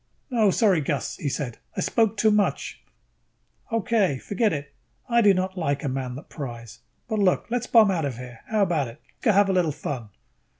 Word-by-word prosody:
"No, 220 -4 +4
sorry, 190 -4 +3
Gus," 145 0 -2
he 145 - -2
said. 130 -4 -4 0.2
"I - - 0
spoke 220 -2 +1
too 220 +1 +4
much." 210 -1 0 0.9
"Okay. 220 - +1
Forget 205 - 0
it. 140 -1 -5 0.3
I 235 -1 +3
do 205 -2 +6
not 185 0 -1
like 140 -3 -1
a - - -1
man 130 -1 -3
that 140 - -10
pries. 120 -6 -8 0.3
But 220 -2 -1
look, 190 -3 +2
let's 245 0 -1
bomb 220 -4 +6
out 165 -5 0
of 130 -4 -4
here, 125 -2 -9
how 215 -2 +2
about 160 -8 +1
it? 115 +5 -11 0.2
Go 225 - +4
have 200 0 +4
a 195 - +1
little 175 -4 +2
fun." 130 -6 -5
180 Hz, 200 wpm, -25 LUFS, 140-210 Hz, 0.9 s, do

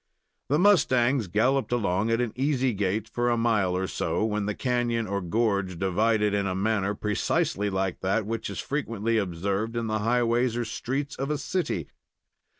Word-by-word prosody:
The 145 - +3
mustangs 130 - +3
galloped 125 +10 +1
along 110 -2 +1
at 115 +1 +2
an 120 -3 -2
easy 130 -1 +1
gait, 100 +2 -1
for 120 +1 -1
a 120 - +2
mile 105 -6 +1
or 95 - -1
so, 105 - -1
when 105 -2 -1
the 105 - -2
canon, 120 -2 0
or 100 -1 -2
gorge, 100 -1 0
divided 105 +3 +1
in 100 -1 +1
a 95 - -2
manner 100 0 0
precisely 105 0 0
like 95 -2 -2
that 100 +3 0
which 115 +2 -3
is - - -6
frequently 115 -6 -1
observed 100 +4 -2
in 115 - -1
the 110 -1 -1
highways 120 +1 +1
or 120 - -1
streets 135 +5 -3
of 135 +2 -3
a 150 - 0
city. 140 - -2
110 Hz, 175 wpm, -26 LUFS, 100-120 Hz, -, The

